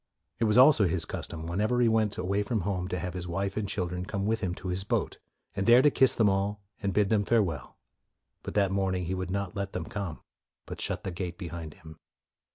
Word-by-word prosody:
It 115 - +2
was 105 +1 +3
also 130 -5 +7
his 85 -1 -1
custom, 80 -1 -6
whenever 105 +8 0
he 120 - +4
went 110 -2 +1
away 100 +3 0
from 105 +1 -1
home, 90 0 -2
to 90 -1 -2
have 90 +1 -4
his 90 -1 -5
wife 95 +3 -2
and 105 -2 -2
children 90 -2 -2
come 100 +1 -3
with 110 +1 +1
him 90 -4 -2
to 95 - -6
his 90 +2 -1
boat, - - -1 0.4
and 100 +1 -1
there 120 +2 +7
to 150 - +6
kiss 130 -1 +4
them 110 - +4
all 100 +1 0 0.2
and 100 - 0
bid 100 +1 +2
them 105 -2 +3
farewell; 95 - 0 0.6
but - - -7
that 100 -2 +3
morning 95 -2 0
he 90 - -2
would 95 -1 -3
not 100 +1 -3
let 100 -1 -3
them - - -3
come, 95 -7 -5 0.4
but - - -7
shut - - -2
the 95 - -3
gate 85 0 -5
behind 85 -4 -7
him. 80 -1 -14
95 Hz, 230 wpm, -29 LUFS, 90-105 Hz, 0.6 s, also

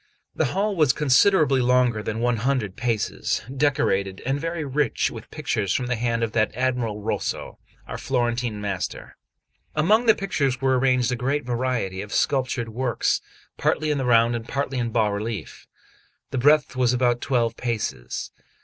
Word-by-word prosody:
The - - +1
hall 205 +1 +1
was 150 -6 +4
considerably 150 0 +4
longer 125 -3 +3
than 110 +2 -3
100 120 -3 0
paces, 115 -2 -1
decorated, 130 -10 +1
and 135 +2 0
very 165 -1 -3
rich 140 0 0
with 115 -5 -10
pictures 115 -10 -1
from 125 - 0
the 125 0 -1
hand 115 0 -1
of 115 - -1
that 110 -1 +2
admirable 120 -4 -1
Rosso, 110 - -3 0.3
our - - -6
Florentine 120 -3 -1
master. 100 -3 -4 0.6
Among 210 +10 +3
the 220 - +7
pictures 140 -10 -1
were 130 -1 +2
arranged 125 -1 +2
a - - 0
great 135 +4 -1
variety 120 -6 -1
of 105 +1 -8
sculptured 130 -4 0
works, 120 0 0 0.4
partly 155 0 +1
in 145 - 0
the 130 - -1
round, 120 -1 +4
and 115 0 -5
partly 135 -1 -2
in 120 -1 -1
bas 110 -3 +1
relief. 100 -4 -5 0.6
The 130 - -1
breadth 145 +2 +4
was 125 -1 +2
about 120 -1 +1
twelve 115 -4 0
paces. 110 - -3
125 Hz, 160 wpm, -24 LUFS, 115-135 Hz, 0.6 s, the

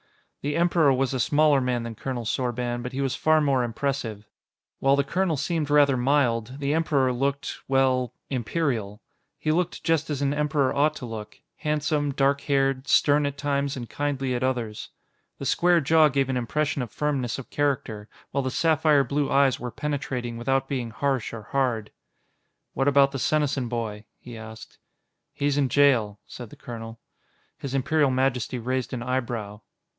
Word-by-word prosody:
The 145 +1 -2
Emperor 170 -4 +3
was 135 0 +1
a 130 - -1
smaller 145 +2 +3
man 125 -2 -1
than 115 -1 -5
Colonel 120 +1 -5
Sorban, 120 0 -2
but 125 +2 -6
he 135 - -2
was 135 -1 0
far 155 0 +3
more 140 -4 +2
impressive. 120 -3 -3 0.5
While 135 +1 +4
the 140 - +2
colonel 170 +2 0
seemed 160 0 -1
rather 145 -2 +5
mild, 125 -2 +1
the 145 0 -1
Emperor 140 -5 +2
looked 140 +3 -2
well, 130 -2 +1 0.2
Imperial. 120 -5 -2 0.3
He 155 - -1
looked 175 +2 -1
just 165 -2 +1
as 145 -2 -2
an 140 0 +1
Emperor 145 -2 +1
ought 150 +2 +2
to 130 - -7
look 110 -2 -7 0.2
handsome, 150 -1 0
dark 140 +1 +1
haired, 135 -1 0
stern 145 0 +4
at 140 0 -5
times 140 -1 -1
and 120 -2 -6
kindly 135 -2 -2
at 120 - -2
others. 120 -5 -2 0.5
The - - -6
square 175 0 +3
jaw 155 +1 +5
gave 135 -2 +1
an 130 - 0
impression 145 +4 -1
of 120 - -4
firmness 135 -6 -1
of 135 - -9
character, 115 -7 -1 0.2
while 140 - 0
the 130 - -2
sapphire 155 0 +3
blue 145 +1 -1
eyes 135 -2 +3
were 125 - -4
penetrating 130 -4 -3
without 135 +3 0
being 125 -4 -3
harsh 135 +2 -1
or 115 -2 -7
hard. 120 -4 -1 0.8
"What 135 - 0
about 140 -1 +5
the 135 - -4
Senesin 140 -4 0
boy?" 110 -3 -4
he 120 -1 -11
asked. 110 0 -11 0.5
"He's 145 0 0
in 135 -2 +2
jail," 115 -7 +3
said 120 -3 -9
the - - -13
colonel. 115 -1 -8 0.6
His 140 -1 -4
Imperial 145 +1 +2
Majesty 130 -1 0
raised 130 +2 -2
an 120 -1 -3
eyebrow. 120 -5 -3
135 Hz, 170 wpm, -25 LUFS, 120-145 Hz, 0.8 s, rather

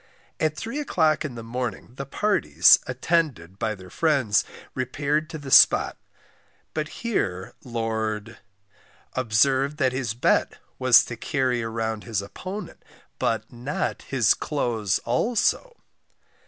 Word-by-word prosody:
At 155 -1 0
three 230 +6 -4
o'clock 160 - +1
in 140 -5 -5
the 115 - -7
morning, 120 -1 -5
the 135 +1 -7
parties, 90 - +4
attended 130 - -1
by 110 -1 -1
their 95 -2 -13
friends, 135 -10 +2 0.3
repaired 145 +4 -1
to 160 - -6
the 140 -3 -8
spot; - - +6 0.8
but 155 -1 -2 0.2
here 95 - -2
Lord 110 -2 -3 0.7
observed 130 +4 +2
that 130 -4 +2
his 125 -4 -2
bet 120 - +1 0.2
was - - +6
to - - -6
carry 125 -2 -1 0.4
his 110 -4 -2
opponent, 185 - -8 0.4
but 110 +1 -1
not 125 +5 -3
his 125 -6 +2
clothes 115 -9 -1
also. 235 - 0
130 Hz, 120 wpm, -25 LUFS, 110-150 Hz, 0.8 s, spot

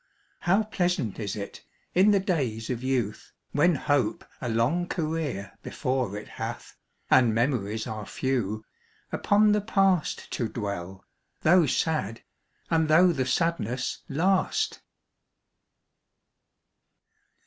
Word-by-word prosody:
How 195 +5 +3
pleasant 180 - -1
is 100 -3 -3
it, 100 -1 -7 0.3
in 190 +4 +5
the 205 -1 +5
days 130 - -1
of 120 -1 -3
youth, 125 -5 -2 0.2
When 160 +4 +3
hope 145 - 0 0.2
a 120 - -2
long 130 +11 +1
career 155 - -3
before 125 -6 -2
it 105 - -8
hath, - - -6 0.4
And 120 -4 +5
memories 110 -3 0
are 110 -2 -5
few, 110 -5 -2 0.5
upon 210 +1 +3
the 210 0 +2
past 195 -5 +1
To 115 -3 -2
dwell, 95 -3 -5 0.4
though 170 0 +5
sad, 125 -7 -1 0.5
and 160 -1 +3
though 170 +4 +6
the 130 -5 -1
sadness 130 -4 -1
last! 185 +7 +1
135 Hz, 115 wpm, -27 LUFS, 110-175 Hz, 0.5 s, though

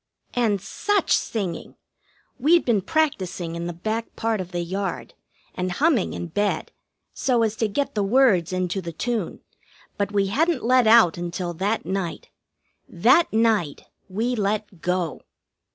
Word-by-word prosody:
And 225 -5 +1
such 410 - -1
singing! 190 -7 -1 0.6
We'd 325 +6 +4
been 225 -5 +2
practising 185 - -1
in 170 0 -4
the - - -3
back 220 +7 -4
part 225 -3 -1
of 180 0 -8
the 175 -1 -2
yard, 190 +3 -4 0.4
and 180 0 -2
humming 285 - +2
in - - -4
bed, 205 +5 -1 0.4
so 245 -3 +1
as 220 -1 0
to 220 - +1
get 275 +8 -2
the 210 - 0
words 200 -5 +3
into 185 +1 -1
the 170 -2 -6
tune; 235 +6 -3 0.6
but 200 0 0
we 200 -1 +2
hadn't 315 - +1
let 250 0 +4
out 220 -7 +6
until 175 0 -3
that 200 +6 -1
night. 190 -3 -4 0.6
That 340 - +4
night 220 -9 +1 0.3
we 225 +6 -1
let 205 -4 -2
go. 180 -3 -1
205 Hz, 150 wpm, -24 LUFS, 180-235 Hz, 0.6 s, out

